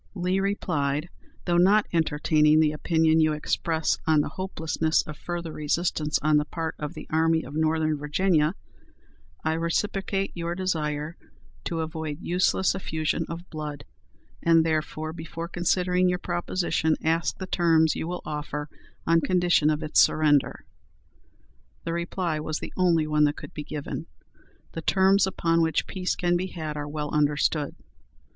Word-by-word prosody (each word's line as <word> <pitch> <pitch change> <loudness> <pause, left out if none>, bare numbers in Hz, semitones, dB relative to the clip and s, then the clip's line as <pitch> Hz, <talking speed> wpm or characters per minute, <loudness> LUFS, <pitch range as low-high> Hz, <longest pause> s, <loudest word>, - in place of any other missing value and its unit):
Lee 185 +1 0
replied, 155 -6 -1 0.4
"Though 175 0 +2
not 205 +4 +5
entertaining 155 -1 +3
the 155 -1 +4
opinion 160 +1 +2
you 155 -1 +3
express 160 +1 0
on 155 -2 +5
the - - -3
hopelessness 160 -4 0
of 155 - -8
further 170 -1 -5
resistance 150 0 0
on 155 0 +4
the 150 - +1
part 160 +1 -4
of 150 +3 -5
the - - -8
Army 160 +1 +2
of - - -9
Northern 155 0 +1
Virginia, 150 +2 +1 0.9
I 160 - +1
reciprocate 195 +4 -1
your 170 0 -3
desire 155 -3 -2 0.5
to 165 -1 -2
avoid 160 -2 -4
useless 185 +2 +1
effusion 160 -3 -2
of 170 +2 -7
blood, 150 -3 -6 0.6
and 165 -1 +4
therefore, 155 0 -2
before 165 +1 -6
considering 180 +1 +1
your 180 - +1
proposition, 175 -2 0
ask 165 +1 +1
the 190 - -5
terms 165 -3 +3
you - - -3
will 180 +1 -5
offer 150 -1 -4 0.4
on 165 0 +4
condition 175 -4 +3
of 155 +1 0
its 155 - +2
surrender." 150 -3 +3 1.2
The 165 - -3
reply 170 -1 -2
was 155 +1 -3
the - - -7
only 170 -4 +3
one 150 0 +3
that 145 0 0
could 145 - -9
be 150 - -5
given. 150 -1 -5 0.6
"The 165 - -5
terms 190 +3 +4
upon 165 -3 +1
which 160 -1 +1
peace 185 -1 -2
can 175 0 +1
be 185 +2 -2
had 155 -5 -5
are 145 0 -4
well 150 -1 -4
understood. 150 0 +1
160 Hz, 150 wpm, -26 LUFS, 155-175 Hz, 1.2 s, not